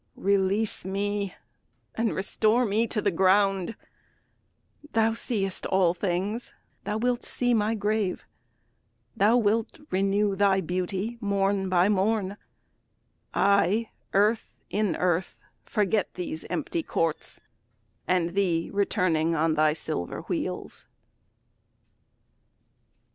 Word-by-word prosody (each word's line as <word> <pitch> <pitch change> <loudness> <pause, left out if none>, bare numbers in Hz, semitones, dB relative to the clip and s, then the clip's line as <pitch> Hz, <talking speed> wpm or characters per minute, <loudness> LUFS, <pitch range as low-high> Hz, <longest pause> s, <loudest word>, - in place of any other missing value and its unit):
Release 200 +2 +1
me, 200 0 -2 0.6
and 225 0 -1
restore 220 +5 +2
me 220 +2 +1
to 210 - -2
the 200 - +2
ground; 195 +2 +2 1.2
Thou 225 0 +3
seest 210 -5 -1
all 185 -3 +3
things, 195 +5 -2 0.3
thou 210 - -1
wilt 245 +2 0
see 245 -1 0
my 220 0 +1
grave: 210 -2 -1 0.9
Thou 215 +5 +4
wilt 225 +5 0
renew 195 +1 +1
thy 195 -1 +3
beauty 185 +6 -3
morn 200 -1 0
by 180 0 +4
morn; 205 0 +1 1.0
I 200 +3 +3 0.2
earth 210 +3 +1
in 210 0 0
earth 180 0 -1 0.3
forget 210 -1 0
these 175 -3 -5
empty 170 -1 -2
courts, 165 -1 -1 0.7
And 175 -2 +1
thee 175 -3 0
returning 180 -5 +1
on 160 0 +2
thy 155 0 +3
silver 155 - -3
wheels. - - -4
200 Hz, 105 wpm, -27 LUFS, 185-215 Hz, 1.2 s, Thou